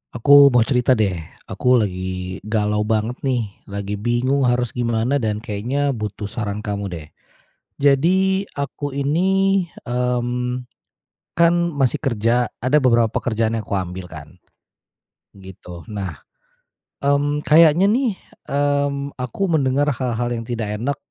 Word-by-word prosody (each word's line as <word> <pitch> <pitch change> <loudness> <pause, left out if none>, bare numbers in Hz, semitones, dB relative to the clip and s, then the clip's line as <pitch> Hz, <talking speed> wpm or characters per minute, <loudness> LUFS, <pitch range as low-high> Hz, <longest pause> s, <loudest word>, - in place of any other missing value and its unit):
Aku 140 +4 +7
mau 125 -4 +4
cerita 125 0 +2
deh. 100 -6 0 0.3
Aku 125 0 +2
lagi 95 -3 -2
galau 105 -1 0
banget 110 +3 -1
nih, 120 -6 -1 0.2
lagi 100 0 -5
bingung 125 +4 +1
harus 120 -1 +1
gimana, 120 +3 0
dan 110 -2 -2
kayaknya 125 +6 -1
butuh 105 -4 -5
saran 105 -2 -4
kamu 100 -1 -3
deh. 80 -3 -7 0.7
Jadi 185 +8 +3
aku 140 0 -4
ini, 190 +8 +1 0.2
mmm, 125 0 -1 0.7
kan 170 0 +4 0.2
masih 135 -4 0
kerja, 120 -2 +1
ada 130 +5 +2
beberapa 115 -3 +3
kerjaan 115 -1 0
yang 110 - -3
kuambil 95 -1 -4
kan 80 -2 -9 1.1
gitu. 90 -3 -11
Nah, 100 -3 -5 0.8
mmm, 145 +1 +1
kayaknya 165 +4 +5
nih, 230 -2 +1 0.3
mmm, 140 0 0
aku 125 - -4
mendengar 145 -2 +1
hal-hal 120 -2 -2
yang 115 -1 -4
tidak 110 -3 -3
enak 140 +4 -1
125 Hz, 125 wpm, -20 LUFS, 105-140 Hz, 1.1 s, Aku